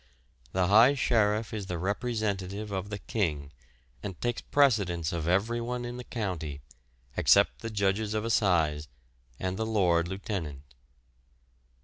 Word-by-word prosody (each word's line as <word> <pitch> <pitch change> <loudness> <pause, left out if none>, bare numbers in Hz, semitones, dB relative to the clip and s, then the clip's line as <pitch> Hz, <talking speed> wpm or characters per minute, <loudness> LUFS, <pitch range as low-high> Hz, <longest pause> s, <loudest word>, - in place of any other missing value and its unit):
The 95 -1 +1
High 115 +9 +6
Sheriff 110 -4 +1
is 105 -3 -4
the 90 - -3
representative 100 0 -2
of 95 +1 -3
the 100 - -4
King, 80 -8 -2 0.5
and 95 -4 -6
takes 120 -1 -1
precedence 100 - +2
of 85 -2 -2
everyone 120 +6 0
in 120 0 -5
the 125 - -6
county, 90 - -4 0.6
except - - +4
the 115 - -5
Judges 105 +1 0
of 110 +1 -1
Assize 80 -9 +2 0.5
and 95 0 -2
the 110 - -1
Lord 90 -6 +2
Lieutenant. 90 - -5
100 Hz, 130 wpm, -29 LUFS, 90-110 Hz, 0.6 s, High